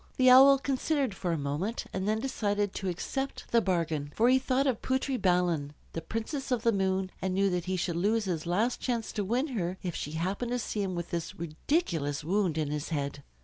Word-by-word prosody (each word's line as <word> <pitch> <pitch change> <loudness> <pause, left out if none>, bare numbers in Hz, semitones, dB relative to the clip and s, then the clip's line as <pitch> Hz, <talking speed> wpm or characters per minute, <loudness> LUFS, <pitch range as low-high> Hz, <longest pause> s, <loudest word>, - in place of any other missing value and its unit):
The 255 -1 +6
Owl 270 +2 +9
considered 275 -2 0
for 180 -2 -2
a 165 - 0
moment, 150 +11 -2
and 190 +1 -2
then 215 +1 +1
decided 205 -5 -1
to 190 - -3
accept 270 +10 -3
the 235 - +5
bargain. 165 -7 -1
For 235 +3 +4
he 260 +1 +5
thought 265 +1 +1
of 260 -6 0
Putri 260 +1 0
Balan, 175 - +1 0.2
the 165 - -3
Princess 225 - -4
of 245 -3 0
the 230 - +4
Moon, 190 -2 0
and 190 0 -1
knew 195 0 +2
that 180 -1 -1
he 185 0 -1
should 170 -1 -1
lose 210 +4 +1
his 170 -3 -2
last 215 +8 +1
chance 235 -3 -2
to 205 - -2
win 245 +9 0
her 185 -7 -2
if 180 -2 -2
she 150 - -4
happened 195 +9 -2
to - - +1
see 220 -3 -3
him 190 -2 -2
with 170 -1 -5
this 170 -2 -3
ridiculous 160 - -1
wound 180 -1 +1
in 150 -2 -1
his 150 -1 -3
head. 140 -2 -3
195 Hz, 220 wpm, -29 LUFS, 170-245 Hz, 0.2 s, Owl